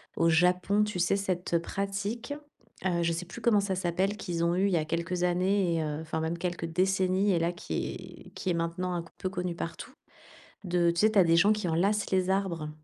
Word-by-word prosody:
au 165 0 +3
Japon, 180 +5 +3
tu 210 -4 -4
sais, 175 +3 +2
cette 180 -3 -1
pratique, 200 +8 -3 0.5
heu, 170 -2 +1
je 170 - +1
sais 170 +2 -3
plus 175 - -10
comment 215 -4 +4
ça 195 -1 -1
s'appelle, 185 +3 0
qu'ils 170 -4 -2
ont 170 +1 +2
eue 195 +2 +2
il - - 0
y - - +4
a 155 - 0
quelques 170 +2 -2
années 180 0 +2
et 160 - 0
heu 150 0 -3
enfin 160 0 -3
même 165 +1 -2
quelques 175 -1 -3
décennies 190 +3 +2
et 170 - +2
là 170 +1 +1
qui 180 +1 -6
est - - -15
qui 185 - -3
est - - +2
maintenant 170 +2 -2
un 170 -1 -2
peu 185 - -3
connue 180 -2 -3
partout 165 - -6 0.7
de 175 -2 +2
tu 170 - -3
sais, 215 - +5
tu 210 - +4
as 185 - +8
des 165 0 +4
gens 205 +5 +5
qui 210 -4 -3
enlacent 195 +6 +1
les 185 -1 +2
arbres, 175 -6 -1
180 Hz, 230 wpm, -29 LUFS, 170-195 Hz, 0.7 s, as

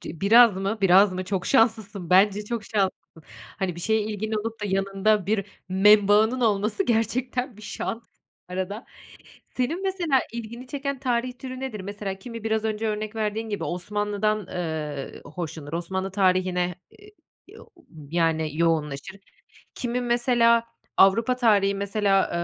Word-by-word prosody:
Ci 160 - -9
biraz 225 0 +6
mı? 195 +3 -2
Biraz 195 +1 +6
mı? 185 0 -4
Çok 190 -2 -2
şanslısın, 215 -7 +1
bence 205 +2 +4
çok 230 0 -4
şanslısın. 190 -6 -3 0.4
Hani, 185 -3 -1
bir 170 - -8
şeye 220 +4 +1
ilgin 215 +1 -4
olup 220 +1 -3
da - - -3
yanında 195 +1 +1
bir 205 -1 0 0.2
membağının 210 +5 +5
olması 215 - +1
gerçekten 245 +2 -1
bir 215 - -14
şans 225 +2 -5 0.5
arada. 190 +5 -4 0.7
Senin 310 +9 -1
mesela 345 -9 +1
ilgini 235 +2 -7
çeken 280 0 -4
tarih 250 -1 -1
türü 255 -1 -7
nedir? 245 -7 -5
Mesela, 200 0 -5
kimi 230 +1 -9
biraz 220 0 0
önce 220 0 -1
örnek 215 0 -3
verdiğin 220 +1 -2
gibi, 205 - -3
Osmanlı'dan, 205 +2 -2
eee, 155 -5 -5
hoşlanır, 155 -2 -7
Osmanlı 190 +3 -3
tarihine, 185 -2 +1 0.2
eee, 415 +1 -16 0.4
yo - - -14
u 340 - -22 0.3
yani, 160 -2 0
yoğunlaşır. 160 0 -1 0.6
Kimi, 245 0 -2
mesela, 240 -1 +3 0.3
Avrupa 225 +6 +4
tarihi, 205 -5 +3
mesela, 200 -1 +1
210 Hz, 140 wpm, -25 LUFS, 190-230 Hz, 0.7 s, biraz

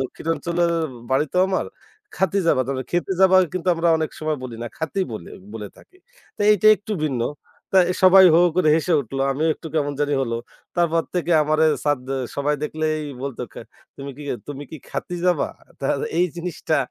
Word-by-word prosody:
দক্ষিণাঞ্চলের 170 +5 -1 0.4
বাড়ি 140 +4 +2
তো - - +3
আমার। 190 - -1 0.5
খাতি 190 +1 +1
যাবা? 130 -5 +3
তবে 130 -1 -2
খেতে 175 +2 0
যাবা, 190 0 +6 0.2
কিন্তু 185 0 -3
আমরা 165 +1 +1
অনেক 155 -1 -2
সময় 155 -1 -1
বলি 120 -3 -6
না, - - -4
খাতি 160 +4 -2
বলি 95 -6 -7 0.3
বলে 105 -2 -6
থাকি। 370 - -20 0.4
তা - - -2
এইটা 210 0 +2
একটু 210 +1 -7
ভিন্ন। 135 -6 -1 0.5
তা 190 - +6
এ - - +2
সবাই 190 0 +9
হো - - +7 0.2
করে 180 -4 +3
হেসে 165 +2 0
উঠল। 135 +1 -6
আমিও 155 +4 0
একটু - - -11
কেমন 145 -2 0
জানি 145 0 +1
হল। 115 -3 -3 0.4
তারপর 165 -1 +2
থেকে 175 -1 0
আমারে 155 +1 +2 0.2
স্যার 145 -2 +2 0.4
সবাই 145 +1 +1
দেখলেই 155 0 -1 0.2
বলত, 135 -3 -5
কা - - -9 0.4
তুমি 140 0 -7
কি 150 - -9 0.3
তুমি 145 0 -6
কি 160 - -7
খাতি 180 - -4
যাবা? 175 -5 +2 0.3
তা 135 - -1 0.3
এই 180 - +5
জিনিসটা 170 -2 -2
155 Hz, 185 wpm, -22 LUFS, 140-175 Hz, 0.5 s, সবাই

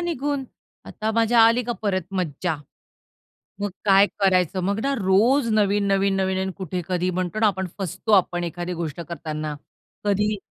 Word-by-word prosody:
निघून, 290 -5 -2 0.4
आता 220 0 -3
माझ्या 230 +1 +4
आली 230 +2 +4
का 240 - -1
परत 190 -3 0 0.2
मज्जा? 160 0 -2 1.0
मग 205 -1 -1
काय 195 0 +6
करायचं? 185 -2 +2
मग 200 +3 0
ना 275 0 0
रोज 225 +7 +3
नवीन-नवीन, 200 -2 +2
नवीन 190 0 0
आणि 190 0 -2
कुठे 180 -1 -3
कधी 180 0 0
म्हणतो 185 +3 -3
ना 220 - +5
आपण 190 -2 0
फसतो 195 +4 -3
आपण 175 -3 +3
एखादी 175 +1 -4
गोष्ट 160 -1 -4
करताना. 155 -2 -5 0.5
कधी 210 +1 +1
195 Hz, 155 wpm, -23 LUFS, 180-215 Hz, 1.0 s, काय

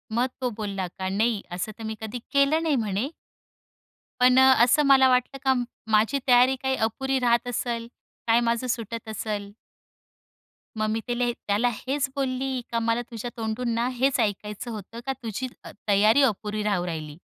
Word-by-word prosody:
मग 245 +2 +2
तो 250 - +1
बोलला 200 -4 -3
का, 190 0 -2
"नाही, 215 +2 +1
असं 180 +5 -3
तर 225 - -9
मी 220 0 -4
कधी 220 +2 -5
केलं 280 +3 +3
नाही" 315 -3 +2
म्हणे. 220 +1 -1 1.1
पण 250 +1 +6
अ, 265 0 +7
असं 255 +5 +4
मला 265 -1 +6
वाटलं 255 +2 +1
का 265 - +4 0.4
माझी 220 +6 +3
तयारी 250 +1 +6
काय 265 0 +1
अपुरी 265 +4 -2
राहत 240 0 +2
असेल, 235 -1 -2 0.4
काय 230 +1 +5
माझं 235 +1 0
सुटत 230 -1 -4
असेल? 210 -2 -4 1.3
मग 215 0 0
मी 220 +1 0
त्याले 240 0 0
त्याला 215 +2 0
हेच 275 +4 -2
बोलली, 265 -1 -1
का 230 - +1
मला 230 +1 +1
तुझ्या 230 +1 -5
तोंडूनना 230 +1 -1
हेच 265 +2 +1
ऐकायचं 210 +1 -2
होतं 220 +2 -8
का 270 - -1
तुझी 230 +4 -3 0.2
अ, - - -9 0.2
तयारी 215 +6 +5
अपुरी 215 -3 0
राहू 200 -4 0
राहिली. 155 -3 -5
235 Hz, 165 wpm, -25 LUFS, 215-255 Hz, 1.3 s, अ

